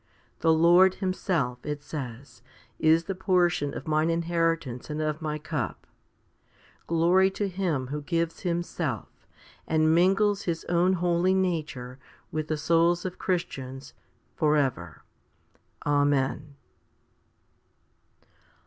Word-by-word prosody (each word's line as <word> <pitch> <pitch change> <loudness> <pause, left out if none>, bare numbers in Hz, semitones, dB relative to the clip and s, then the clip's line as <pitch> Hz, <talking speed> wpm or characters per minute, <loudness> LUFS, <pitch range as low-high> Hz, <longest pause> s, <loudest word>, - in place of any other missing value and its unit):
The 165 - +3
Lord 175 +4 +5
Himself, 170 -10 -2
it 150 -1 -4
says, 125 -4 -8 0.4
is 160 +1 +4
the 195 - -3
portion 180 -6 +1
of - - -7
mine 155 +1 +2
inheritance 165 -6 -1
and 150 0 -3
of 155 0 -2
my 155 -1 -2
cup. 150 -3 -4 1.0
1 165 - -1
Glory 185 +3 +4
to 200 +1 -2
Him 175 -8 -1
who 150 +1 -4
gives 165 +2 -2
Himself, 170 - -3 0.6
and 155 0 +3
mingles 195 +4 +3
His 165 -2 -2
own 175 +2 +2
holy 180 +1 +2
nature 150 -9 -2 0.3
with 155 -1 -3
the 155 - -1
souls 170 +3 +2
of 185 -1 -5
Christians, 135 -7 -4 0.4
for 155 -1 +2
ever. 125 - -2 0.8
Amen. 145 0 +1
165 Hz, 115 wpm, -27 LUFS, 145-175 Hz, 1.0 s, Lord